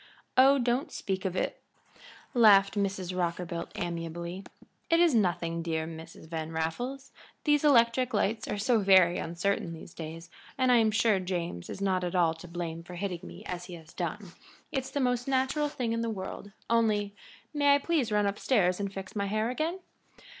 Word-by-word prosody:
"Oh, 270 +2 +7
don't 250 +4 0
speak 190 -1 -3
of 185 -1 -1
it," - - -2 0.7
laughed 205 -5 +6
Mrs. 190 -3 -2
Rockerbilt, 170 -1 -2
amiably. 170 +2 -4 0.5
"It 330 0 +4
is 340 -4 +5
nothing, 175 -6 +1
dear 160 -1 -2
Mrs. 160 0 -10
Van 160 -1 -4
Raffles. 245 +13 -3 0.3
These 295 -1 +3
electric 250 -3 +4
lights 220 +1 0
are 210 - -2
so 225 +3 +2
very 185 -3 +5
uncertain 175 +1 -1
these 165 +1 -11
days, 165 +1 -8 0.3
and 255 -1 +3
I 245 - +6
am 225 -1 +4
sure 220 -2 +3
James 175 - -4
is - - -6
not 190 -2 +1
at 180 +1 -2
all 170 -3 +3
to 165 +2 -11
blame 170 -1 -5
for 175 +1 -10
hitting 180 -2 -3
me - - -10
as 180 -1 -5
he 180 - -8
has 160 -1 -14
done; 180 +2 -4 0.4
it's 265 -3 -2
the 285 - -2
most 245 -1 0
natural 270 +3 +1
thing 240 -5 -2
in 230 - -1
the 230 - -1
world, 200 0 -6 0.2
only 210 -3 +1 0.4
may 285 -1 +5
I - - +5
please 285 -5 0
run 210 -1 +2
up 200 0 -1
stairs 185 -8 +2
and 200 -1 -2
fix 195 0 -8
my 200 -1 -1
hair 215 +3 0
again?" 325 +8 -2
200 Hz, 185 wpm, -29 LUFS, 175-240 Hz, 0.7 s, Oh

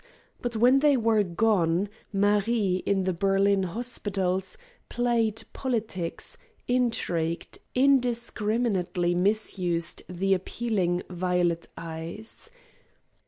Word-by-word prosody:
But 240 -1 -2
when 250 +5 +5
they 285 -1 +4
were 225 -2 +3
gone, 185 -1 +1 0.2
Marie 205 -1 +2
in 195 -1 +2
the 185 0 0
Berlin 195 +2 +2
hospitals 195 - -2 0.3
played 230 -2 0
politics, 220 -9 -3 0.3
intrigued, 180 -10 0 0.2
indiscriminately 230 -8 +1
misused 180 -3 0
the 190 +2 +1
appealing, 185 -2 -1
violet 175 -1 0
eyes. 165 +6 -7
200 Hz, 85 wpm, -27 LUFS, 180-230 Hz, 0.3 s, when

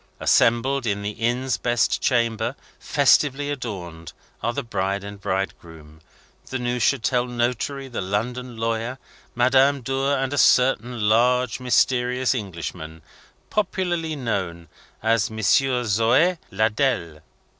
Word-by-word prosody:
Assembled 120 +2 +2
in 100 -1 -1
the 105 - -2
Inn's 120 +3 -1
best 120 -1 +1
chamber, 115 -4 0 0.2
festively 145 0 +2
adorned, 90 - -6 0.3
are 120 - 0
the 140 +3 -4
bride 100 -3 -2
and 100 0 -9
bridegroom, 80 -5 -5 0.5
the 130 - -3
Neuchatel 125 0 0
notary, 125 +3 -2
the 125 - -4
London 120 +5 -3
lawyer, 115 +2 -2 0.4
Madame 130 +3 +3
Dor, 135 +3 0
and 135 +1 -2
a 145 - 0
certain 125 -3 +3
large 125 +2 +2
mysterious 125 0 +2
Englishman, 85 - -6 0.5
popularly 175 -6 -1
known 95 - -3 0.3
as 115 -1 +2
Monsieur 125 +4 +2
Zhoe 120 - +2
Ladelle. 110 - 0
120 Hz, 115 wpm, -23 LUFS, 105-130 Hz, 0.5 s, Madame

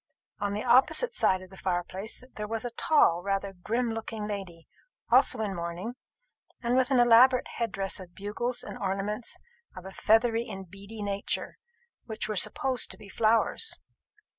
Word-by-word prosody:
On 200 -1 -1
the 210 - -2
opposite 310 - +4
side 185 0 +2
of 185 - -14
the 190 - -12
fire 175 -2 -1
place 195 +7 -4
there 210 0 -5
was 225 +2 -3
a 240 - -3
tall, 230 - +3
rather 195 +1 -2
grim 230 +6 -1
looking 225 -1 -4
lady, 190 -5 -6 0.4
also - - +5
in 205 -3 -1
mourning, 170 +6 -4 0.7
and 240 +1 +1
with 260 0 +3
an 265 -3 +4
elaborate 245 +2 +6
headdress 195 -5 -2
of 180 -2 -12
bugles 235 +5 -3
and - - -8
ornaments 200 +3 -2 0.4
of 185 - -9
a 190 - -7
feathery 225 +3 +2
and 190 -3 -8
beady 200 +2 -8
nature, 200 - -3 0.5
which 220 -2 -4
were 215 - -2
supposed 255 +5 +1
to - - -9
be 200 - -13
flowers. 225 - +2
210 Hz, 165 wpm, -28 LUFS, 195-235 Hz, 0.7 s, elaborate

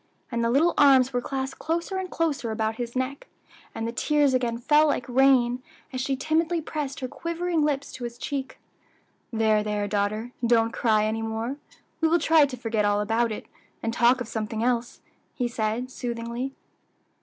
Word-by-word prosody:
and 235 -1 0
the 230 - +2
little 300 +8 +3
arms 265 -2 +6
were 245 - +1
clasped 265 +1 -4
closer 340 +4 -2
and 375 -1 -3
closer 305 -9 -1
about 220 0 -1
his 240 0 -5
neck, 260 +2 -3 0.5
and 225 - -2
the - - -2
tears 290 +2 +2
again 240 -2 0
fell 300 +5 +4
like 250 -4 -1
rain, 255 -1 +4 0.3
as 255 - -2
she 270 +1 0
timidly 320 +5 +1
pressed 295 -3 -4
her 255 - -2
quivering 335 +2 -1
lips 285 -2 -1
to 250 - -8
his 235 0 -5
cheek. 270 +1 -4 0.7
"There, 220 -2 +3
there 210 -1 -1
daughter! 215 +3 -1
don't 230 -1 +3
cry 215 -2 +2
any 220 +1 -1
more; 225 +4 -3 0.4
we 325 - +4
will 330 +2 +4
try 320 -3 +5
to 255 -2 -7
forget 225 -2 -1
all 205 0 +2
about 225 +2 +1
it, 215 - -5 0.4
and 225 - -1
talk 240 +2 +4
of 245 - -4
something 220 0 -3
else," 240 -1 -1 0.3
he 245 - 0
said 235 +2 -2
soothingly. 240 +2 -4
245 Hz, 180 wpm, -26 LUFS, 225-280 Hz, 0.7 s, arms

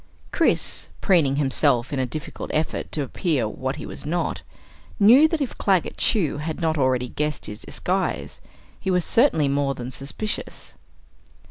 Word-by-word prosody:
Chris, - - 0
preening 160 -9 +3
himself 140 -2 +2
in 140 - -1
a 130 - 0
difficult 155 +3 -6
effort 155 +1 -2
to 150 - -1
appear 140 - 0
what 130 +5 -3
he 150 - -7
was - - -7
not, 170 +4 -2 0.6
knew 245 +9 +8
that 315 -1 -2
if 270 - -2
Claggett 190 -4 +1
Chew 175 - +2
had 155 +2 -4
not 160 -2 +1
already 130 -3 +1
guessed 150 +1 -2
his 105 - -6
disguise, - - -3 0.4
he - - -3
was 180 -2 +2
certainly 225 - +3
more 140 0 0
than 125 +1 -6
suspicious. 140 +11 -5
150 Hz, 155 wpm, -23 LUFS, 135-180 Hz, 0.6 s, knew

